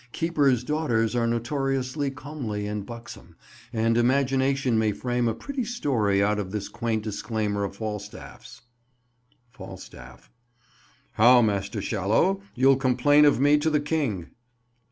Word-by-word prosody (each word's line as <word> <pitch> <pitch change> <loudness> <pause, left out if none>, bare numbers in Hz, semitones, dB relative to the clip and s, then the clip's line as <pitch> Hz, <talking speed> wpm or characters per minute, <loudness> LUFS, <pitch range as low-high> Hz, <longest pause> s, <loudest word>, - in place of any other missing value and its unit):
Keeper's 145 -7 +1
daughters 125 -6 0
are 115 -1 +1
notoriously 135 +3 -1
comely 135 -7 -5
and 105 -1 -4
buxom, 115 -3 -11 0.4
and 115 +1 +1
imagination 130 -1 +1
may 110 -1 +1
frame 120 0 -1
a 115 - -1
pretty 280 - -4
story 120 - 0
out 105 +1 +1
of 95 -2 -4
this 100 0 -5
quaint 115 -2 -2
disclaimer 105 -1 -2
of 100 0 -4
Falstaff's— 105 -1 -8 0.9
Falstaff. 65 - -12 0.8
How, 120 +2 +6
Master 100 -2 -1
Shallow, 110 - +1
you'll 135 +1 +4
complain 135 +3 +4
of 145 -4 +4
me 145 +2 +4
to 160 +2 +1
the 150 -1 +2
king? 145 - -2
120 Hz, 130 wpm, -25 LUFS, 105-140 Hz, 0.9 s, How